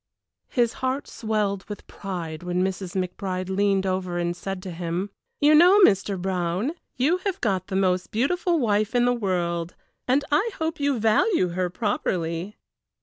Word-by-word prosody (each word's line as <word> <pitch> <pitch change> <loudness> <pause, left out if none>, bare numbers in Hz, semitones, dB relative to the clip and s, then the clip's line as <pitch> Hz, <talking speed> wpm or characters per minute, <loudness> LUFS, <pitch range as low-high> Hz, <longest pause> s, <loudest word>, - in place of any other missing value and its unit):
His 240 -3 +1
heart 260 +2 -1
swelled 210 -3 -1
with 205 - -7
pride 175 -5 -6
when 180 +1 -1
Mrs. 190 -1 -3
McBride 185 0 -3
leaned 195 -1 +2
over 185 -2 -1
and 175 0 -1
said 185 +1 -5
to 185 - -6
him: 175 +3 -3 0.3
"You 295 +1 +5
know, 355 +6 +7
Mr. 195 - +4
Brown, 185 - -1 0.3
you 295 +8 +3
have 385 0 -3
got 190 -5 0
the 190 - -4
most 185 -1 +1
beautiful 340 - +1
wife 215 -3 +1
in 245 0 +4
the 245 - +3
world, 175 -6 -2 0.3
and 275 +3 +2
I 395 +11 +3
hope 320 0 -2
you 285 -2 +1
value 220 - +3
her 180 +1 -1
properly." 180 -2 -2
195 Hz, 160 wpm, -25 LUFS, 180-245 Hz, 0.3 s, know